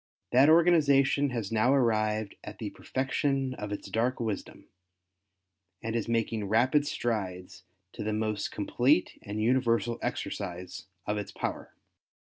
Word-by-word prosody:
That 135 +4 +6
organization 145 -4 +4
has 115 -5 -4
now 115 +3 +3
arrived 110 -4 +1
at - - -8
the - - -5
perfection 135 0 -1
of 105 -4 -6
its 105 - -5
dark 120 +3 0
wisdom, 110 -4 -4 1.2
and 115 0 -3
is 115 - -1
making 115 -2 -1
rapid 130 +7 +3
strides 95 -10 -3 0.3
to - - -5
the 110 - -1
most 105 -1 -1
complete 130 - +1
and 105 +1 -5
universal 120 0 +1
exercise 90 -1 -4 0.2
of 105 0 -1
its 105 - -6
power. - - -5
115 Hz, 130 wpm, -29 LUFS, 105-130 Hz, 1.2 s, That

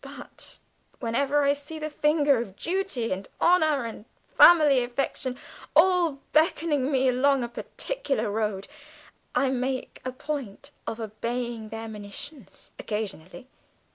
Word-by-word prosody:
But - - -10 0.4
whenever 280 +4 +1
I 280 0 +4
see 290 +3 -7
the 310 0 -4
finger 295 -3 +3
of 195 -5 -8
duty 345 - -2
and 190 +1 -3
honour 310 -7 +3
and 220 -2 -7 0.2
family 295 -7 +7
affection 250 +1 -3 0.4
all 360 -4 +5 0.2
beckoning 305 -3 +2
me 265 -1 +3
along 265 +1 +3
a - - -2
particular 270 - -3
road, 210 -2 -2 0.7
I 270 - +3
make 255 0 -3
a 255 - -3
point 265 -5 -6 0.2
of 225 - -4
obeying 230 +1 -4
their 225 +1 -6
monitions 215 - -9
occasionally. 210 +1 -5
260 Hz, 125 wpm, -26 LUFS, 225-295 Hz, 0.7 s, family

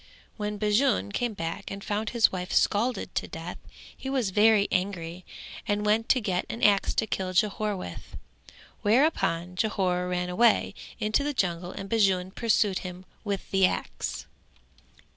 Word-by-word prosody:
When 210 -1 -3
Bajun 210 - +2
came 240 - -2
back 165 -2 -4
and 195 0 -7
found 215 +1 -2
his 235 -2 +4
wife 180 -1 -4
scalded 235 +5 +1
to - - -2
death - - -7 0.4
he 265 - -6
was 255 -7 0
very 210 0 +5
angry 180 -2 -2 0.4
and 205 0 0
went 220 +2 +2
to 260 - +5
get 185 -5 -1
an 235 - -5
axe 200 -1 +4
to - - +2
kill 190 -3 -3
Jhore 210 +1 +1
with; 90 - -8 0.7
thereupon 205 - +2
Jhore 185 -3 0
ran 180 0 -1
away 215 +2 +3 0.3
into 215 +6 +1
the 290 0 -2
jungle 175 -4 -1
and 195 - -7
Bajun 190 -4 +2
pursued 210 -4 +2
him 180 0 -8 0.2
with 200 -2 -4
the 195 -1 +5
axe. - - -4
200 Hz, 155 wpm, -27 LUFS, 180-220 Hz, 0.7 s, very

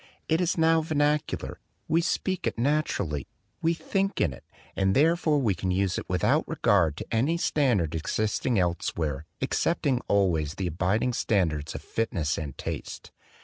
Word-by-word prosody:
It 160 +2 +2
is 175 -1 0
now 160 0 +4
vernacular; 150 -1 -1 0.3
we 165 +1 +3
speak 185 +1 -1
it - - -2
naturally; 115 - 0 0.3
we 165 +1 +2
think 195 +3 -1
in 70 - +1
it; - - -13 0.3
and 95 0 +2
therefore 160 0 +3
we 120 -8 +2
can 95 +1 -3
use 95 0 +1
it - - -10
without 90 -2 +2
regard 85 -7 +2
to - - -5
any 135 +9 +2
standard 120 - +1
existing 110 +8 0
elsewhere 80 -4 -1
excepting 140 -7 +1
always 85 -7 +1
the 95 - -3
abiding 95 +8 0
standards 80 -10 0
of - - -6
fitness 85 -9 -1
and 75 -5 -6
taste. - - -6
105 Hz, 150 wpm, -27 LUFS, -, 0.3 s, now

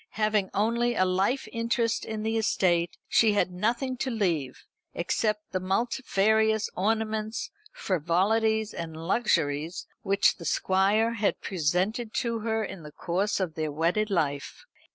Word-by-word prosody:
Having 215 -2 +1
only 235 +3 +1
a 185 - +3
life 195 +8 0
interest 230 0 0
in 220 -1 -4
the 220 +1 -1
estate, 175 -6 +1
she 220 -2 +4
had 205 -2 +1
nothing 235 +8 -1
to 260 - -2
leave, 170 - -1 0.3
except 210 +4 -1
the 185 - -1
multifarious 220 +1 +1
ornaments, 220 +2 -1 0.2
frivolities, 210 +6 +1
and 160 -1 -6
luxuries 165 -4 0 0.2
which 200 +1 +2
the 170 - -9
Squire 200 +7 +2
had 215 -3 0
presented 190 +7 -1
to 230 -2 -1
her 220 0 -1
in 195 -3 -7
the 150 -1 -10
course 190 +8 -1
of 180 -4 -2
their 155 -1 -2
wedded 170 +8 0
life. 145 -7 -2
205 Hz, 135 wpm, -27 LUFS, 180-220 Hz, 0.3 s, she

